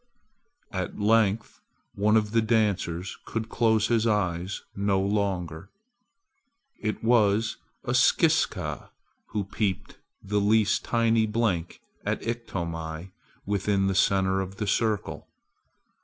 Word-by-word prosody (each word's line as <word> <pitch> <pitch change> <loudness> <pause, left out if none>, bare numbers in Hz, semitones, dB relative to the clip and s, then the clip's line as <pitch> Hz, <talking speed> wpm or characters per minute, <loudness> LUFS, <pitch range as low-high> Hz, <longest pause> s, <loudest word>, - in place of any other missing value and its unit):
At 95 -3 -4
length 110 0 +2 0.3
one 105 +2 +3
of 105 -1 0
the 115 0 +3
dancers 100 -6 0
could 115 -1 -4
close 110 -2 +2
his 115 -1 +2
eyes 95 -3 -1
no 100 -1 +1
longer! 95 -4 -2 1.1
It 110 +1 -3
was 110 -1 +3 0.3
a - - -2
Skiska - - +2 0.4
who 105 - -2
peeped 100 -1 -3 0.2
the 100 +1 0
least 105 +1 +3
tiny 115 -1 +2
blink 105 -6 -1 0.2
at - - -2
Iktomi 85 -7 -4 0.3
within 100 0 +1
the 95 - +1
center 95 0 +2
of 95 0 -6
the 105 - -3
circle. 105 +1 -1
100 Hz, 110 wpm, -26 LUFS, 95-110 Hz, 1.1 s, one